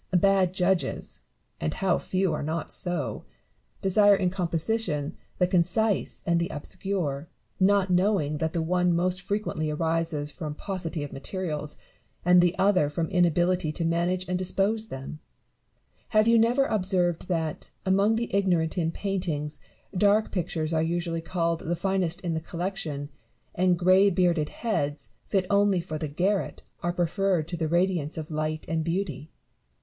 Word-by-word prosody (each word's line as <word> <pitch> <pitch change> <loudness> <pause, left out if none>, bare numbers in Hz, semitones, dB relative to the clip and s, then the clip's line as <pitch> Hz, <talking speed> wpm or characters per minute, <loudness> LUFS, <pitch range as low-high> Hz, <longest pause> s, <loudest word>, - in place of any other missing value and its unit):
Bad 195 -1 +3
judges 185 -1 -1 0.4
(and 75 - -2
how 190 -2 +1
few 185 -3 0
are - - -2
not 160 +1 -3
so 175 -6 +1 0.3
!) - - -40
desire 205 +1 +5
in 185 -2 0
composition 170 -3 -1 0.2
the 180 - +3
concise 185 +4 0
and 170 0 +2
the 170 - -1
obscure, 165 -2 -3 0.3
not 195 0 +3
knowing 180 -5 +2
that 160 0 -1
the 165 - 0
one 180 +1 +2
most 180 +2 0
frequently 195 -5 -2
arises 160 -1 -1
from 150 -2 -6
paucity 175 -4 -4
of 145 - -7
materials, 150 0 -4 0.5
and 180 0 +7
the 175 +1 +2
other 190 -7 +3
from 160 +2 -2
inability 175 -1 +2
to 165 - -2
manage 175 +2 0
and 180 0 -1
dispose 200 +4 0
them. 135 -1 -7 0.9
Have 215 0 +3
you 230 0 +6
never 245 +4 +3
observed 180 -6 0
that, 165 -1 -2 0.2
among 200 +3 +3
the 230 -3 -2
ignorant 180 -4 +1
in 165 -1 0
painting, 165 -6 -2 0.4
dark 205 +3 +3
pictures 165 -3 -2
are 160 - +2
usually 165 0 -1
called 170 -1 -1
the 170 +2 -2
finest 190 -1 -1
in 175 -2 -2
the 160 - -2
collection, 165 -5 -4 0.4
and 180 0 +2
greybearded 180 -3 +3
heads, 145 -11 -2 0.2
fit 190 -2 +1
only 200 -2 +4
for 155 -2 -5
the 155 - -2
garret, 185 +7 -1 0.2
are 175 - 0
preferred 175 -1 0
to 175 - -3
the 160 -1 -1
radiance 170 -2 0
of 155 -1 -5
liglit 155 0 -2
and 160 0 -1
beauty 170 -2 -3
175 Hz, 155 wpm, -27 LUFS, 160-190 Hz, 0.9 s, and